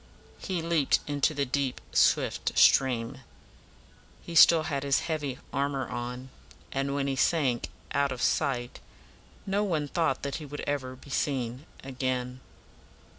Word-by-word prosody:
'" - - -26
He 180 -4 -2
leaped 165 -4 +2
into 145 +1 0
the 140 -1 0
deep, 135 0 -1
swift - - +2
stream. 130 -1 +4 1.0
He 170 - -8
still 165 0 +7
had 140 -3 -2
his 140 -1 +2
heavy 145 -5 -3 0.2
armor 140 -1 -1
on; 125 +1 -5 0.4
and 135 +1 -1
when 140 -1 0
he 135 -1 -1
sank 135 -4 +1 0.2
out 140 -1 +1
of 130 - -5
sight, 125 -3 0 0.7
no 200 +1 0
one 160 -7 -1
thought 160 -3 0
that 140 -1 -2
he 155 - -8
would 145 +1 -6
ever 130 -3 -3
be 135 +2 -14
seen 130 0 -2 0.2
again. 130 -1 -3
140 Hz, 145 wpm, -28 LUFS, 130-150 Hz, 1.0 s, still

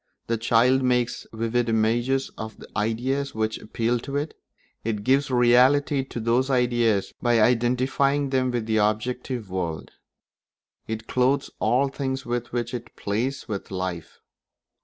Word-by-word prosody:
The 115 - 0
child 120 +4 +3
makes 125 -1 0
vivid 115 +1 -1
images 120 +4 +1
of 110 0 -7
the - - -12
ideas 125 +6 -1
which 110 0 -1
appeal 115 +2 -1
to 140 +4 -6
it; 145 +2 -2 0.5
it 105 -2 -2
gives 135 +4 +2
reality 130 +3 +4
to 130 - -7
those 120 +4 +1
ideas 120 -5 +2
by 120 -1 +3
identifying 130 +4 +2
them 130 -1 +2
with 120 -3 -2
the 110 -1 +1
objective 110 +1 -1
world; 85 -4 -3 1.0
it 110 0 -5
clothes 130 +2 +1
all 125 +6 +2
things 135 -1 -3
with 120 0 -3
which 120 0 -2
it 120 -1 -7
plays 120 +7 -2
with 100 -4 -5
life. 90 -3 -5
120 Hz, 140 wpm, -25 LUFS, 110-130 Hz, 1.0 s, reality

